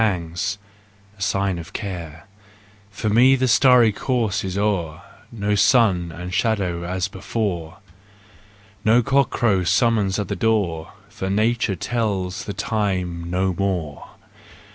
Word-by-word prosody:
JEST, 95 -1 -1 0.6
RUSE 95 -1 -2
AND 95 - +1 0.2
REVENGE 80 - -10
25 85 -6 -6 0.7
For 105 +2 -3
me 125 +5 +5
the 130 0 +1
starry 125 -2 +5
course 115 -2 -1
is 95 0 -4
o'er, 90 -7 -1 0.3
No 105 -2 -1
sun 100 -5 +3
and 90 +2 -7
shadow 95 -7 0
as 90 +2 -2
before, 95 -4 -4 1.1
No 115 +3 +4
cockcrow 120 -7 +2
summons 100 +2 +2
at 105 - -2
the - - -3
door. 95 -8 -1 0.2
For 95 -3 -5
nature 110 0 +1
tells 95 -3 -2
the 100 - -4
time 90 -7 -2
no 95 +1 0
more! 90 -7 -3
100 Hz, 125 wpm, -22 LUFS, 90-110 Hz, 1.1 s, me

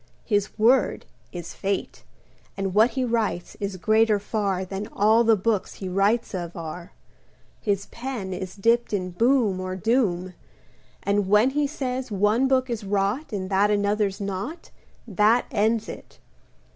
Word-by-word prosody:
His 205 -2 0
word 235 +5 +3 0.3
is 175 -2 -7
Fate, 195 0 -3 0.5
And 195 -1 -2
what 220 +4 +5
he 260 - +1
writes 225 -7 -1
Is 200 -2 -3
greater 215 +3 +3
far 200 -2 -2
Than 195 +2 -5
all 220 +3 +3
the 225 -1 +5
books 210 0 -1
He 190 - -6
writes 200 +6 +1
of 175 -2 -5
are. 170 +2 -7 0.7
His 200 -1 -1
pen 235 -7 -5
Is 185 0 -6
dipped 230 +3 +2
in 185 -2 -2
boom 230 -1 +2
Or 185 0 -4
doom; 185 -4 0 0.7
And 200 -1 +1
when 210 +6 +4
He 290 +1 +1
says 260 -3 -4
one 210 +5 +2
book 260 -1 +2
is 235 -3 -4
rot, 200 +9 -1
And 190 -3 -3
that 200 +2 +3
another's 205 -1 +1
not, 200 - -5 0.4
That 215 +3 +3
ends 220 -1 +1
it. - - -10
205 Hz, 150 wpm, -24 LUFS, 195-230 Hz, 0.7 s, what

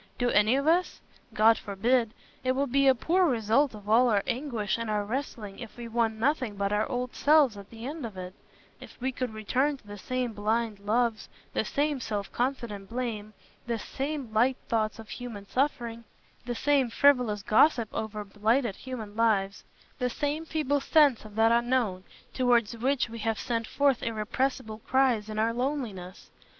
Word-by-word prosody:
Do 245 -1 +1
any 215 +4 +4
of 275 +1 0
us? 345 +3 +2 0.4
God 225 +1 +5
forbid. 230 +3 0 0.3
It 255 0 +2
would 275 -1 -1
be 275 +1 +4
a 265 - +6
poor 355 +8 +2
result 240 +1 +2
of 205 -1 -12
all 240 +3 +5
our 205 -3 +2
anguish 235 -5 -2
and 230 -1 -3
our 210 -1 0
wrestling 220 -4 -5
if 235 -1 -9
we 240 -1 -6
won 225 -1 0
nothing 255 -3 0
but 200 0 -1
our 210 +1 0
old 250 0 -3
selves 290 -6 +4
at 200 -1 -11
the 230 0 -9
end 300 +2 -5
of 215 -5 -6
it—if 180 +1 -13
we 260 +1 -1
could 255 -2 -3
return 255 +7 0
to 245 - -26
the 205 0 -9
same 250 +1 -2
blind 215 +1 -1
loves, 225 +2 0 0.2
the - - +1
same 290 -1 -1
self 210 -4 -4
confident 235 -6 -3
blame, 225 -3 -4 0.3
the 235 -1 -1
same 270 0 -4
light 250 +4 +3
thoughts 215 -2 0
of 225 -1 -10
human 225 -5 -7
suffering, 240 -4 -1 0.4
the 240 - -2
same 275 0 +2
frivolous 245 -6 +3
gossip 235 +2 +4
over 215 -1 -4
blighted 215 +2 0
human 225 -6 -7
lives, 205 -3 +1 0.4
the 250 -1 0
same 295 +5 -2
feeble 290 -3 0
sense 290 -8 +4
of 210 -1 -12
that 225 +1 +4
Unknown 235 -5 +1 0.3
towards 240 -3 +2
which 260 +3 0
we 230 0 -8
have 225 0 -1
sent 230 -3 -2
forth 280 -3 +2
irrepressible 220 +1 -2
cries 245 -4 +1
in 215 - -5
our 225 +1 +1
loneliness. 235 -8 -4
235 Hz, 175 wpm, -28 LUFS, 215-260 Hz, 0.4 s, a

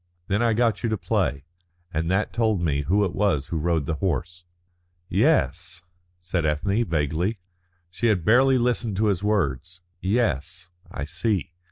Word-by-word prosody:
Then 100 +3 +1
I 115 -1 +3
got 115 -1 +1
you 115 - 0
to 110 - 0
play, 70 -6 -1 0.5
and 80 +1 -1
that 95 +3 0
told 110 -4 +1
me 75 -4 0
who 100 +8 +2
it 90 - -3
was 95 -9 0
who 85 - -2
rode 80 -2 0
the 80 - -1
horse." 90 -1 -2 0.6
"Yes," 90 +8 +1 0.4
said 90 -1 -2
Ethne, 90 +9 +1
vaguely. 80 +4 -1 0.5
She 120 +6 -1
had 95 -7 +1
barely 130 +5 +5
listened 120 -4 0
to 110 - +2
his 95 +1 -7
words. 85 - -1 0.2
"Yes, 90 - -1 0.2
I 70 - -5
see." 90 +4 -1
90 Hz, 160 wpm, -24 LUFS, 80-105 Hz, 0.6 s, barely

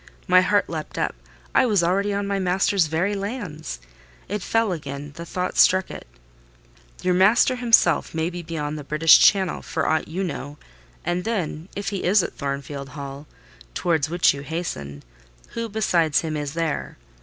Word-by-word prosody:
My 185 0 +6
heart 205 +2 +2
leapt 155 -2 -6
up: - - 0 0.4
I - - +4
was 205 -6 +2
already 195 +4 +1
on 200 0 -1
my 200 0 -1
master's 185 -1 +2
very 170 +6 0
lands. 195 - -5 0.5
It 205 +1 -3
fell 225 +1 +1
again: 145 -3 -6
the 170 +1 -8
thought 180 +1 -3
struck 190 0 +4
it:— - - -9 1.0
"Your 180 - +2
master 205 +7 +4
himself 230 -8 +3
may 160 +2 -1
be 175 0 -6
beyond 155 -2 -4
the - - -7
British 155 +3 +6
Channel, 190 -3 +3
for 160 - -2
aught 160 0 +1
you 180 +5 -3
know: 145 -4 -5 0.5
and 175 +1 -1
then, 180 -6 -3
if 200 0 -3
he 195 -2 -4
is 190 +1 +4
at - - -5
Thornfield 140 0 -5
Hall, 140 +1 -7 0.5
towards 160 -4 0
which 175 +1 +3
you 140 - -7
hasten, 105 - -5 0.5
who 230 0 -4
besides 175 -8 +2
him 155 -2 -3
is 145 0 -4
there? 165 -3 -2
170 Hz, 170 wpm, -23 LUFS, 150-195 Hz, 1.0 s, My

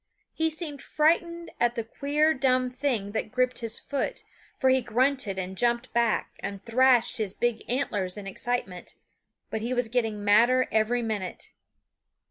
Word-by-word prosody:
He 320 0 +1
seemed 310 -3 -5
frightened 335 +2 +1
at 240 0 +2
the 230 - -2
queer, 295 +7 +1
dumb 255 -2 +1
thing 245 -6 -1
that 220 0 -3
gripped 255 0 0
his 230 -1 -4
foot, 280 -2 -3 0.3
for 260 -1 +3
he 260 0 +3
grunted 245 -3 0
and 190 0 -3
jumped 235 +3 0
back 235 -2 +1
and 200 -1 -5
thrashed 245 0 +3
his 210 -4 -2
big 240 -2 -1
antlers 210 -7 -1
in 205 - -7
excitement; 195 -2 -4 0.6
but 220 - -2
he 240 +3 -2
was 245 -2 +1
getting 225 -4 -1
madder 235 +5 +4
every 225 +2 +1
minute. 210 -5 -4
240 Hz, 155 wpm, -27 LUFS, 220-260 Hz, 0.6 s, madder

